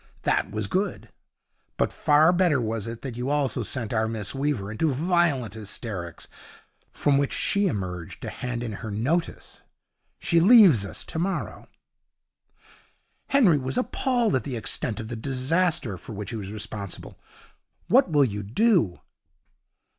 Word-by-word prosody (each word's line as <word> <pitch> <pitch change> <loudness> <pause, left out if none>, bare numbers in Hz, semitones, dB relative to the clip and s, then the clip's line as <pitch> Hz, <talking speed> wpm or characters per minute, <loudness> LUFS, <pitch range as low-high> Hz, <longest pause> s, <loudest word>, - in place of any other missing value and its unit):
That - - +1
was 110 0 -3
good; 190 - -2 0.7
but - - 0
far 155 +4 +4
better 175 -6 +3
was 110 -2 -3
it 115 0 -7
that 130 -4 -5
you 125 +3 -3
also 140 -3 0
sent 115 +1 -3
our 110 0 +1
Miss 110 -3 -4
Weaver 135 -8 -2
into 140 +8 0
violent 150 - +1
hysterics, 100 -5 -6 0.6
from 140 -1 +2
which 140 - 0
she 200 -1 +2
emerged 90 - -4
to - - -4
hand 120 -1 -4
in 115 - -4
her 110 - -5
notice. 135 +12 -2 0.6
She 170 - +2
leaves 180 - +7
us - - -4
tomorrow.' 180 +4 -3 1.6
Henry 210 - +4
was 130 0 -2
appalled 245 -3 +1
at 130 - 0
the 135 - -4
extent 110 -1 -2
of 110 - -5
the 120 - -5
disaster 135 - 0
for - - -9
which 105 +1 -6
he - - -4
was 100 -3 -6
responsible. 105 -2 -7 0.7
'What 255 -4 +4
will 145 -3 +4
you 105 -4 -3
do?' 135 - +2
125 Hz, 145 wpm, -25 LUFS, 110-165 Hz, 1.6 s, leaves